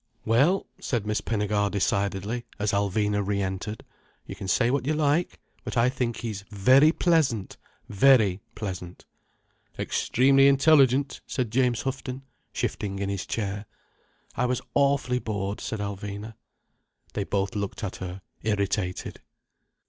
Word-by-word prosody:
"Well," 140 +13 +3
said 115 -5 -2
Miss 105 -1 -1
Pinnegar 105 -2 0
decidedly, 100 +3 -1
as 105 -1 0
Alvina 105 +1 +1
re 100 0 -1
entered. 100 +3 -4 0.4
"You 95 - -7
can 95 -1 -7
say 120 +5 +2
what 135 -1 -1
you 155 - +1
like—but 150 -2 -2
I 120 +2 +4
think 125 -3 -2
he's 110 -4 -4
very 130 +9 +5
pleasant, 150 - +1 0.3
very 105 -4 +4
pleasant." 90 -4 -6 0.7
"Extremely 135 +2 +3
intelligent," 140 -1 +4
said 125 -4 -2
James 125 -1 +1
Houghton, 135 0 -4 0.3
shifting 100 -2 -3
in 100 0 -2
his 100 -2 -3
chair. 105 -1 -3 0.7
"I 125 - +1
was 125 0 0
awfully 140 -3 +2
bored," 100 -3 -3
said 110 - -4
Alvina. 100 +2 -5 0.8
They - - -1
both 100 0 -1
looked 100 +1 -4
at 100 - -4
her, 95 0 -7 0.2
irritated. 100 -3 -2
110 Hz, 130 wpm, -26 LUFS, 100-130 Hz, 0.8 s, very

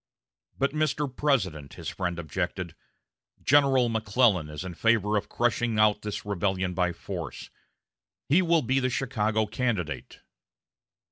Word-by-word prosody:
"But, 140 +1 +1
Mr. 150 -3 -1
President," 95 - 0
his - - -8
friend 90 -2 -3
objected, 85 +2 -3 0.7
"General 135 -3 +4
McClellan 110 -6 +2
is 75 +3 -6
in 90 - -5
favor 105 +2 +2
of 105 - -1
crushing 120 -1 0
out 105 -1 +4
this 105 -1 -5
rebellion 95 -2 -1
by 90 0 +1
force. 85 -3 -7 0.8
He 165 +7 +5
will 170 -3 +3
be 130 +3 +2
the 130 -1 0
Chicago 110 -4 0
candidate." 105 -7 -3
105 Hz, 130 wpm, -27 LUFS, 90-130 Hz, 0.8 s, He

